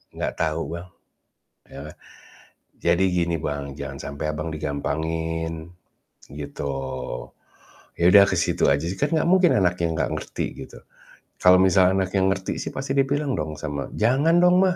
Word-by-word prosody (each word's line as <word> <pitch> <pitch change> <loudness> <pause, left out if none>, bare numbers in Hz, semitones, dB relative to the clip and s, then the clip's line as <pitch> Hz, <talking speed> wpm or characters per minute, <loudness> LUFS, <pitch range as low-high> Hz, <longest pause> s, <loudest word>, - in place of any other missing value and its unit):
enggak - - -2
tahu, 80 +1 0
Bang. 85 +1 -8 0.8
Ya - - -11
kan? - - -21 0.9
Jadi, 85 +2 +3
gini, 85 -1 +1
Bang, 70 -2 -3
jangan 70 -1 -6
sampai 70 +2 -5
Abang 75 +2 -4
digampangin, 80 +3 -3 0.6
gitu. 70 0 -7 1.4
Ya, 85 - 0
udah 100 -1 +9
ke 95 - 0
situ 85 - +1
aja, 70 +3 -1
sih, 90 - -2
kan 145 - 0
enggak 160 - +2
mungkin 185 -2 +5
anaknya 90 -3 +1
enggak 80 - -1
ngerti, - - -4 0.2
gitu. - - -14 0.6
Kalau 90 0 +7
misalnya 95 0 +4
anaknya 95 +1 -1
ngerti, 95 0 -4
sih, - - -5
pasti 135 0 -4
dia 135 - +4
bilang 145 0 -1
dong 75 -1 -3
sama, 70 -4 -4
"Jangan, 135 +10 +3
dong, 180 +1 +5
mah! 180 - 0
85 Hz, 160 wpm, -23 LUFS, 75-100 Hz, 1.4 s, udah